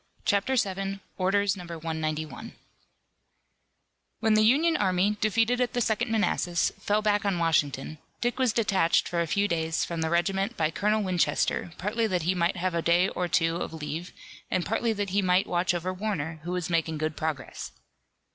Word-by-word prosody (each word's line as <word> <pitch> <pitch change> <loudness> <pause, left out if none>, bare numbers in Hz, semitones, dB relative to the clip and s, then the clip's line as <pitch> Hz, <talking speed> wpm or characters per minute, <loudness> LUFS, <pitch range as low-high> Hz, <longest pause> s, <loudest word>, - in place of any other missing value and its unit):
CHAPTER 205 +6 +2
VII. 195 -3 -1 0.2
ORDERS 200 +2 +2
NO. 180 - -8
191 160 +4 -4 1.6
When 220 -1 +2
the 215 - +5
Union 295 +10 +4
army, 190 0 +2
defeated 230 +3 +2
at 250 - 0
the 245 - 0
Second 230 +1 0
Manassas 190 -6 +1
fell 210 +1 0
back 205 -1 +2
on 200 -3 0
Washington, 155 -3 0 0.2
Dick 240 +2 -1
was 255 -3 +3
detached 200 -7 +2
for 170 -1 -1
a 170 - -1
few 200 +5 +1
days 160 -2 0
from 170 -1 -4
the 160 - 0
regiment 190 +3 0
by 155 -1 +1
Colonel 210 +4 +1
Winchester, 180 -1 0
partly 220 +4 0
that 180 -5 -1
he 180 +3 +2
might 175 0 0
have 185 0 -1
a 170 - 0
day 175 +3 +3
or 180 - -2
two 165 0 +1
of 170 - -4
leave, 160 +2 -5 0.4
and 185 - 0
partly 225 +1 0
that 205 -3 -2
he 200 +1 +2
might 185 0 +3
watch 180 +1 +1
over 180 +1 -2
Warner, 180 -6 -3
who 175 +2 -5
was 180 -2 -2
making 165 -2 0
good 155 0 -2
progress. 155 -4 -4
185 Hz, 180 wpm, -27 LUFS, 165-210 Hz, 1.6 s, the